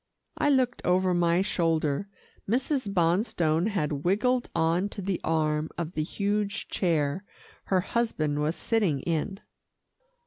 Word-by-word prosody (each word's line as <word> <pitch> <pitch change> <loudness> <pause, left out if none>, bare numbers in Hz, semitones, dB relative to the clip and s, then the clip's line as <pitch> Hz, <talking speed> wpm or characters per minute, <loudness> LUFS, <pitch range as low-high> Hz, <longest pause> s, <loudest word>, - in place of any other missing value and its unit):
I 290 - +1
looked 255 -3 +2
over 185 +1 +2
my 175 +1 +3
shoulder. 165 -1 0 0.4
Mrs. 255 -1 0
Bonstone 175 -2 +1
had 150 -9 -1
wiggled 245 +7 +1
on 165 +4 +1
to 205 - -8
the 190 -1 -2
arm 155 -1 0
of 170 -1 -3
the 155 - -2
huge 200 +4 -2
chair 165 -1 0 0.4
her 185 -2 +2
husband 170 -10 -1
was 150 +3 0
sitting 195 - 0
in. 170 +6 -2
180 Hz, 130 wpm, -27 LUFS, 160-205 Hz, 0.4 s, my